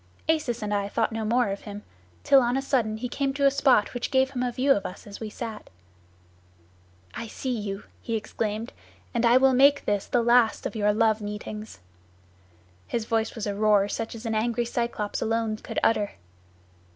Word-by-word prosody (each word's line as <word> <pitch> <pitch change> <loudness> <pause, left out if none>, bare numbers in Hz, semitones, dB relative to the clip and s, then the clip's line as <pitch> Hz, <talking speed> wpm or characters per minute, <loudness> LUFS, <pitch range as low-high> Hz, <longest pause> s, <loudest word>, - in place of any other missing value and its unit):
Acis 280 -8 0
and 210 0 -2
I 200 0 -1
thought 225 +2 0
no 225 0 -3
more 235 +1 +2
of 195 0 -4
him, 205 0 -8 0.4
till 275 - +6
on 245 +1 +1
a - - 0
sudden 230 -6 0
he 250 +3 -3
came 270 +2 -2
to 280 -1 +1
a 275 - +6
spot 265 -6 +3
which 245 - -3
gave 265 -1 +2
him 250 -2 -3
a 250 -1 0
view 265 +3 +1
of 200 -7 +3
us 180 - -8
as 200 -1 -9
we 220 - -5
sat. 220 0 -7 1.4
'I 230 - -5
see 250 +3 -3
you,' 205 -2 -4 0.2
he 230 - -3
exclaimed, 220 +1 -3 0.4
'and 235 -1 +2
I 240 +2 +6
will 265 0 +5
make 280 +2 +5
this 205 -1 0
the 240 -2 +1
last 235 -1 +3
of - - -3
your 210 -1 +2
love 220 0 +2
meetings.' 210 - -7 1.1
His 230 -2 -2
voice 225 0 -1
was 225 - -4
a 205 - -1
roar 205 -1 +3
such 225 +3 -4
as 230 +1 -9
an 225 - -1
angry 235 +2 0
Cyclops 235 -3 -2
alone 225 -1 0
could - - -8
utter. 210 -2 +2
225 Hz, 200 wpm, -26 LUFS, 210-245 Hz, 1.4 s, till